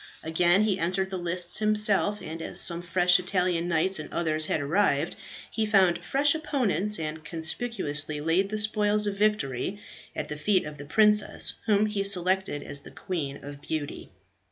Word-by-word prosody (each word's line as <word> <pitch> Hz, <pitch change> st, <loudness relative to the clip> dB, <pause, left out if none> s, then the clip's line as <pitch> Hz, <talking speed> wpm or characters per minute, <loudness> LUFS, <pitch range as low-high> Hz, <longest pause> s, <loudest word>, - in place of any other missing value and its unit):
Again 175 Hz, +5 st, +2 dB
he 200 Hz, -3 st, 0 dB
entered 190 Hz, +3 st, -1 dB
the 190 Hz, -, -4 dB
lists 175 Hz, 0 st, 0 dB
himself, 210 Hz, -1 st, +2 dB
and 160 Hz, +1 st, -7 dB
as -, -, -3 dB
some 170 Hz, -1 st, +3 dB
fresh 180 Hz, +1 st, +3 dB
Italian 180 Hz, -2 st, -1 dB
knights 175 Hz, +2 st, +1 dB
and 155 Hz, -, -8 dB
others 155 Hz, -2 st, -1 dB
had -, -, 0 dB
arrived, 155 Hz, 0 st, 0 dB, 0.4 s
he 220 Hz, -, -2 dB
found 195 Hz, -5 st, +2 dB
fresh 280 Hz, +1 st, +2 dB
opponents, 230 Hz, -, 0 dB
and 155 Hz, 0 st, -5 dB
conspicuously 160 Hz, -3 st, -1 dB
laid 165 Hz, +6 st, 0 dB
the 215 Hz, -, -3 dB
spoils 210 Hz, 0 st, +1 dB
of 205 Hz, -1 st, -2 dB
victory 200 Hz, -, -1 dB, 0.4 s
at -, -, -4 dB
the 150 Hz, -, -6 dB
feet 190 Hz, +4 st, +1 dB
of 150 Hz, -1 st, -9 dB
the 145 Hz, -, -8 dB
princess, 210 Hz, +6 st, +3 dB
whom 210 Hz, -1 st, +3 dB
he 210 Hz, -2 st, -2 dB
selected 190 Hz, -4 st, +1 dB
as 145 Hz, -, -1 dB
the -, -, -12 dB
Queen 150 Hz, -8 st, -6 dB
of 145 Hz, 0 st, -10 dB
Beauty. 150 Hz, -1 st, -5 dB
180 Hz, 170 wpm, -26 LUFS, 160-210 Hz, 0.4 s, some